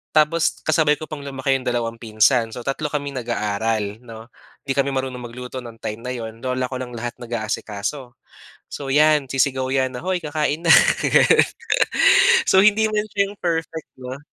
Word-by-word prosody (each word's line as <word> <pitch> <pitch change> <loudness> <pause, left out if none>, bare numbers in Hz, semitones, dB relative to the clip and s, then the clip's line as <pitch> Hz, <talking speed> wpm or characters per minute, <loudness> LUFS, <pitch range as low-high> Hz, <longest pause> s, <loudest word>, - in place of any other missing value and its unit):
tapos 155 +2 +2
kasabay 155 -1 +3
ko 155 +1 -10
pang 150 - -5
lumaki 135 -1 -1
yung 130 - -9
dalawang 115 -1 -2
pinsan. 115 +1 +2
So, 120 - -7
3 140 +3 -2
kaming 140 -2 -4
nag-aaral, 110 -2 -2
'no? 115 -1 -12 0.3
'Di 135 - -4
kami 140 0 0
marunong 130 -1 -3
magluto 125 +2 -7
no'ng 115 -2 -11
time 105 +1 -4
na - - -2
'yon. 115 -1 -7
Lola 130 +1 -2
ko 130 - -4
lang 125 -2 -7
lahat 120 +1 -6
nag-aasikaso. 120 +2 -4 0.5
So 140 - -7
'yan, 150 -1 +4
sisigaw 130 -1 +1
yan 130 -1 +1
na, 145 - -8
"Hoy, 185 -1 -1
kakain 155 +1 -2
na!" - - +9 0.3
Gano'n. - - +4 1.0
So, 190 - +5
hindi 215 +1 +4
man 210 0 0
siya 200 0 0
yung 205 - -14
perfect, 160 -2 -3
'no? 130 +2 -7
130 Hz, 175 wpm, -21 LUFS, 120-150 Hz, 1.0 s, na